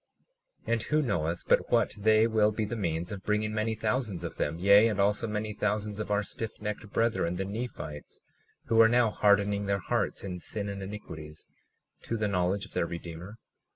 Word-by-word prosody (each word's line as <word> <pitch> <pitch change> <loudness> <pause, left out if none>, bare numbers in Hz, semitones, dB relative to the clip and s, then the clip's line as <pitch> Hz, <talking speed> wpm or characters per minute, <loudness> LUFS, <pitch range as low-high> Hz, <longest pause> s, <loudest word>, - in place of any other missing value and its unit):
37:10 - - 0
And 115 - +1
who 150 +6 +1
knoweth 85 - -1
but - - +3
what - - +3
they 110 +1 +4
will 110 -2 +3
be 110 0 -2
the 110 +3 -4
means 85 -4 -2
of 100 -2 -5
bringing 105 +1 0
many 110 +1 0
thousands 110 -3 -1
of - - -6
them, 75 +3 -1
yea, 100 +5 +6
and 105 -3 -1
also 105 +3 +2
many 105 0 -3
thousands 105 0 -2
of 105 - -4
our 105 0 +1
stiffnecked 105 0 -5
brethren, 115 -7 +1
the 95 +2 -2
Nephites, 100 -8 -6 0.4
who 115 0 +5
are 115 - +7
now 120 -2 +3
hardening 100 -1 +2
their 100 0 +2
hearts 95 - -1
in 90 -2 -5
sin 100 +3 -4
and 100 0 -5
iniquities, 80 -6 -8 0.5
to 115 - -3
the 105 -1 0
knowledge 95 0 0
of - - -16
their 85 - 0
Redeemer? 85 +3 -7
105 Hz, 190 wpm, -29 LUFS, 95-110 Hz, 0.5 s, are